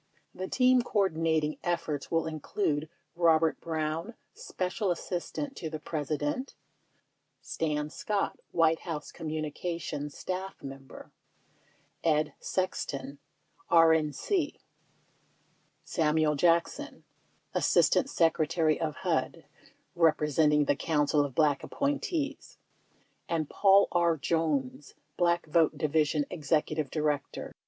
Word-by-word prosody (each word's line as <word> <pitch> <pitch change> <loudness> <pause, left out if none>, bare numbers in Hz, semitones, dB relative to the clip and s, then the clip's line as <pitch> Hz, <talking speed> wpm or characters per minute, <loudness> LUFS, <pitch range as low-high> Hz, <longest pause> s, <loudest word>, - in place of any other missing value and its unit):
The 185 - -5
team 255 +2 +4
coordinating 160 -8 0
ef 175 -1 0
forts 150 -4 -4
will 165 -1 +1
include 155 -1 -2 0.3
Robert 165 -2 +3
Brown, 160 +6 -3 0.2
Special 185 +2 -3
Assistant 180 +10 -3
to 160 - -4
the 155 - -4
Pres 150 -2 -4
ident; 150 - -2 0.9
Stan 150 -2 -2
Scott, 205 +3 -2
White 165 -1 +3
House 155 -4 -6
Communications 155 -1 -4
Staff 190 +1 -5
Mem 135 0 -8
ber; - - -12 0.9
Ed 155 -2 +2
Sexton, 140 -7 -3 0.5
RAC; 160 -3 +5 1.7
Samuel 155 -2 +1
Jackson, 170 +3 +1 0.5
Assistant 275 - +3
Secretary 160 - +2
of 155 -2 -1
HUD - - -1 0.5
(representing 150 -2 +3
the 140 - +2
Council 150 -1 +1
of 140 -3 -5
Black 150 -3 +3
appointees); 285 +1 -2 0.7
and 160 -3 0
Paul 200 0 +5
R. 170 -2 +2
Jones, 145 -4 -1 0.2
Black 170 -1 +2
Vote 160 0 +2
Division 150 -1 +1
Executive 155 -2 0
Director. 150 -2 -2
160 Hz, 100 wpm, -29 LUFS, 150-175 Hz, 1.7 s, RAC